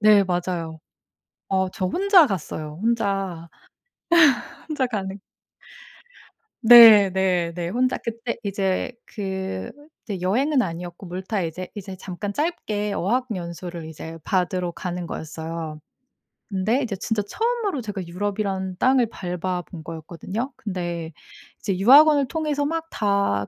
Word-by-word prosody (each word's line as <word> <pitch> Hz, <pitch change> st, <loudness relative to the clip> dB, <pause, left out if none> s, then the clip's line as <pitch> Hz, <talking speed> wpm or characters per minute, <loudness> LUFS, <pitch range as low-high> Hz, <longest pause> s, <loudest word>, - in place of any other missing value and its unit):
네 210 Hz, -1 st, +6 dB
맞아요. 175 Hz, -3 st, -3 dB, 0.7 s
어 190 Hz, -1 st, +1 dB
저 185 Hz, -4 st, -2 dB
혼자 370 Hz, -, +5 dB
갔어요. 155 Hz, -5 st, -5 dB
혼자 195 Hz, -7 st, -1 dB, 1.2 s
혼자 285 Hz, -4 st, 0 dB
가는 200 Hz, -4 st, -4 dB, 1.4 s
네 225 Hz, -4 st, +10 dB
네 180 Hz, -3 st, +1 dB
네. 170 Hz, -1 st, -3 dB
혼자 255 Hz, +3 st, +1 dB
그때 230 Hz, +1 st, -4 dB
이제 195 Hz, +3 st, -1 dB
그 190 Hz, -, -4 dB, 0.3 s
이제 195 Hz, -5 st, -5 dB
여행은 260 Hz, +10 st, +2 dB
아니었고 175 Hz, -1 st, -5 dB
물타 190 Hz, +3 st, -3 dB
이제 175 Hz, +3 st, -5 dB
이제 195 Hz, -2 st, -7 dB
잠깐 195 Hz, +2 st, -5 dB
짧게 210 Hz, -10 st, -2 dB
어학연수를 180 Hz, -7 st, -3 dB
이제 160 Hz, +1 st, -8 dB
받으러 180 Hz, -1 st, 0 dB
가는 180 Hz, -1 st, -5 dB
거였어요. 160 Hz, 0 st, -6 dB, 0.7 s
근데 215 Hz, +7 st, +1 dB
이제 215 Hz, -5 st, -3 dB
진짜 210 Hz, +1 st, -1 dB
처음으로 445 Hz, -, -1 dB
제가 205 Hz, -4 st, -5 dB
유럽이란 190 Hz, +1 st, -3 dB
땅을 255 Hz, 0 st, +3 dB
밟아본 180 Hz, -3 st, -4 dB
거였거든요. 170 Hz, -, -5 dB
근데 175 Hz, -4 st, -4 dB, 0.5 s
이제 195 Hz, -3 st, -2 dB
유학원을 285 Hz, +5 st, +7 dB
통해서 300 Hz, -3 st, -1 dB
막 325 Hz, +2 st, -1 dB
다 200 Hz, -, +1 dB
195 Hz, 260 characters per minute, -23 LUFS, 175-230 Hz, 1.4 s, 네